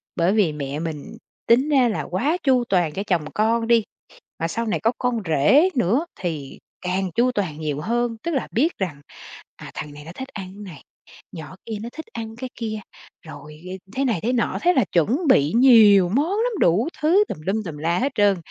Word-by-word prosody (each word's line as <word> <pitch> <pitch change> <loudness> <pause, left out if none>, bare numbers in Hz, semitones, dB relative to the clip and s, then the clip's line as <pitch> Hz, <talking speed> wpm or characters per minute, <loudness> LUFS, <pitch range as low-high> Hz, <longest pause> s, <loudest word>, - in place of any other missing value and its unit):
bởi 175 +3 +2
vì 195 -8 +2
mẹ 145 0 -4
mình 160 -3 -6 0.3
tính 255 +6 +4
ra 265 -5 +4
là 215 - -2
quá 275 - -1
chu 255 -3 +3
toàn 175 -5 +1
cho 195 - -3
chồng 170 -5 +1
con 225 +2 +1
đi. 235 -2 +4 0.6
Mà 165 - 0
sau 230 +7 -3
này 220 - -1
có 225 - +2
con 245 -2 -1
rể 165 - +4
nữa 245 - +1
thì 155 -7 -5 0.2
càng 185 +1 -2
chu 250 +2 +3
toàn 175 -9 -3
nhiều 150 -2 -3
hơn, 235 +2 -1
tức 340 - -2
là 270 -6 -1
biết 305 +9 +1
rằng, 160 -7 -4 0.5
à, - - -11
thằng 150 -1 -7
này 145 0 -11
nó 160 - -8
thích 265 - -6
ăn 195 +1 -8
này, 175 -7 -11 0.5
nhỏ 165 +1 -9
kia 220 -2 -4
nó 235 - -6
thích 320 - -8
ăn 225 -1 -6
cái 255 +1 -6
kia, 215 -2 -4 0.5
rồi, 150 0 -11
ừ, 185 +1 -6 0.2
thế 275 - 0
này 230 -9 0
thế 245 - 0
nọ, 240 - 0
thế 355 +1 +4
là 255 - +3
chuẩn 190 - +2
bị 145 - +4
nhiều 215 -7 +7
món 285 - +1
lắm, 455 +5 0
đủ 195 - +3
thứ 360 +7 +4
tùm - - -4
lum 215 +3 -1
tùm 160 -5 -7
la 170 +3 0
hết 275 +3 0
trơn. 205 -2 +3
210 Hz, 215 wpm, -22 LUFS, 170-245 Hz, 0.6 s, nhiều